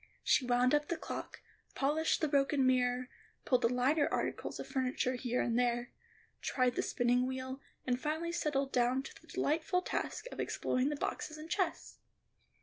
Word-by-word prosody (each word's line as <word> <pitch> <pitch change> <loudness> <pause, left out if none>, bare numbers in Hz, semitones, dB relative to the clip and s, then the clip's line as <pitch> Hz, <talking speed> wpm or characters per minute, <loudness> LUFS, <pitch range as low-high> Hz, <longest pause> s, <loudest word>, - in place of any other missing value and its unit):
She 255 - +3
wound 250 +1 +3
up 295 0 +2
the 340 - -1
clock, - - -6 0.3
polished 300 +4 +2
up - - -15
the 310 - +3
broken 275 -1 +3
mirror, 250 -1 +2 0.4
pulled 250 - +3
the 230 - +4
lighter 265 +5 +2
articles - - -2
of - - -4
furniture 255 -1 0
here 245 0 -1
and 235 0 +1
there, 240 0 0 0.5
tried 255 -2 +1
the - - 0
spinning 245 +1 +2
wheel, 260 +1 -4 0.2
and 250 0 0
finally 315 +3 -1
settled 295 -5 0
down 250 +2 +2
to - - -11
the - - -21
delightful 335 +5 0
task - - -3
of - - -8
exploring 255 +2 0
the 295 - -1
boxes 310 +2 -3
and 315 +1 -9
chests. 365 -3 -1
260 Hz, 175 wpm, -34 LUFS, 250-300 Hz, 0.5 s, the